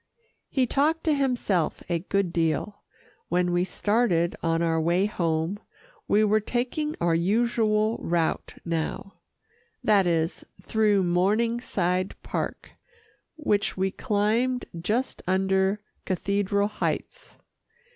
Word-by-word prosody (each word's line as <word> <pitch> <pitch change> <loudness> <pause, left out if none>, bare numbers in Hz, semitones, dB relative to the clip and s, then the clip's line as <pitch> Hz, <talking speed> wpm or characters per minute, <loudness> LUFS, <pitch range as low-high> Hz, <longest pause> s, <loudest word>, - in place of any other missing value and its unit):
He 260 -2 +2
talked 300 +6 +1
to 315 - +2
himself 245 - 0
a 170 -1 0
good 190 0 -1
deal, 170 +5 -1 0.5
when 180 +1 +1
we 175 0 +2
started 185 -3 +1
on 165 0 +1
our 165 -1 +1
way 175 +4 +2
home. 170 -1 -1 0.5
We 210 +1 +4
were 215 0 +3
taking 255 +8 -2
our 170 -1 +2
usual 215 +4 +1
route 165 -1 -1
now 170 +3 -3 0.6
that 200 -4 +4
is, 165 -1 0 0.2
through 210 -3 +2
Morningside 185 0 +1
Park - - -4 0.6
which 210 -13 0
we 190 +1 +1
climbed 230 +4 0 0.2
just 230 +9 -1
under 190 +1 +2 0.3
Cathedral 200 +2 0
Heights. - - -4
200 Hz, 110 wpm, -26 LUFS, 175-225 Hz, 0.6 s, We